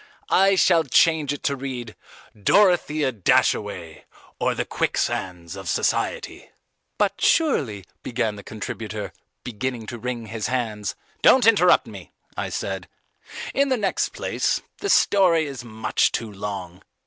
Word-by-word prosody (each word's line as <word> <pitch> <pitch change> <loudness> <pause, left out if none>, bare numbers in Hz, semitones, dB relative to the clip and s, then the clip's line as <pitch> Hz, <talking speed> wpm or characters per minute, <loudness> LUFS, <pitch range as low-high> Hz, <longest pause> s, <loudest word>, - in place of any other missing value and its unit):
I 195 0 +5
shall 175 -3 +4
change 160 -4 +3
it 145 - -5
to 140 - 0
read 125 -4 -6 0.4
Dorothea 155 - +3
Dashaway, 95 -5 0 0.3
or, - - +1
The - - -2
Quicksands 90 -2 -2
of 95 -3 -6
Society." - - -1 0.5
"But 200 -1 0
surely," 130 - +2 0.2
began 110 -3 -2
the 100 - -9
contributor, 105 0 -6 0.3
beginning 120 0 -4
to 120 +2 -7
wring 120 -1 -4
his 110 0 -4
hands 110 -6 -2 0.3
"Don't 255 -3 +6
interrupt 205 -6 +5
me," - - -11 0.2
I - - -3
said. - - -4 0.6
"In 280 0 +2
the 260 - +2
next 200 -4 0
place, - - -1 0.2
the 405 - -3
story 180 - +4
is 135 -4 -7
much 110 -2 0
too 110 -2 -3
long." 95 -3 -6
120 Hz, 135 wpm, -23 LUFS, 105-165 Hz, 0.6 s, Don't